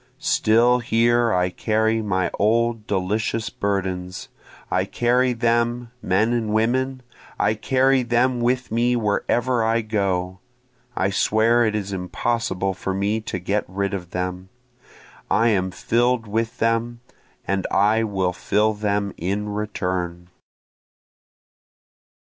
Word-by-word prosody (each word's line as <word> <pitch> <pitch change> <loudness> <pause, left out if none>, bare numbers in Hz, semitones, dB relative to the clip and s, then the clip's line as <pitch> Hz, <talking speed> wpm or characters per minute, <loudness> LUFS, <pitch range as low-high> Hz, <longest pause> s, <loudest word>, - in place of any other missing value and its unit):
(Still 120 +3 +3
here 120 0 +2
I 90 -2 +1
carry 110 +3 0
my 95 -4 -1
old 115 +1 +1
delicious 105 +3 -1
burdens, 95 -2 -3 0.4
I - - +2
carry 125 +1 +1
them, 120 0 0
men 105 +6 +1
and 115 -3 -1
women, 130 +4 0 0.3
I 110 - +2
carry 130 +4 +2
them 120 +1 +1
with 125 0 0
me 120 +2 +2
wherever 120 +2 0
I 115 +1 +2
go, 95 -4 -1 0.6
I 95 +1 0
swear 110 +4 +3
it 110 -1 0
is 100 -2 -3
impossible 95 0 -1
for 95 +1 -4
me 105 +3 0
to 105 - -4
get 100 +3 -1
rid 100 +1 -2
of 90 -3 -5
them, 90 +1 -4 0.8
I 115 +1 +3
am 95 -4 +1
fill'd 120 +5 0
with 110 +2 -2
them, 115 +1 0 0.4
and 95 0 -1
I 105 +3 +3
will 95 -4 -1
fill 105 +4 +1
them 105 -1 -1
in 100 +4 -2
return.) 90 -4 -3
110 Hz, 125 wpm, -22 LUFS, 95-120 Hz, 0.8 s, Still